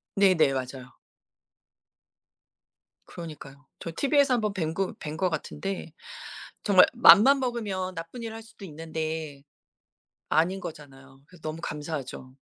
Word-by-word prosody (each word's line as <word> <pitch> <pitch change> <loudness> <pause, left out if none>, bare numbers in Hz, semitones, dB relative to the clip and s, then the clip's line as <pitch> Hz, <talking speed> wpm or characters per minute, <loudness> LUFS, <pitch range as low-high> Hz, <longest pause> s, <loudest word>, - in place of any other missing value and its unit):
네네. 185 -8 +4
맞아요. 130 0 -5 2.1
그러니까요. 145 -4 -10
저 165 - -6
티비에서 280 - +3
한번 215 -4 -1
뵌 160 -5 -2
거 195 +2 -2
뵌 155 +1 -6
거 185 +2 +1
같은데 165 +2 -5 0.7
정말 195 -3 +7
마음만 245 +3 +8
먹으면 205 -7 -3
나쁜 165 +9 -7
일을 225 -1 -5
할 225 - -9
수도 220 -3 -13
있는데 160 -3 -5 0.9
아닌 180 +5 +2
거잖아요. 135 -4 -11
그래서 180 +1 -18
너무 155 +1 -5
감사하죠. 145 -4 -6
165 Hz, 275 characters per minute, -27 LUFS, 150-200 Hz, 2.1 s, 마음만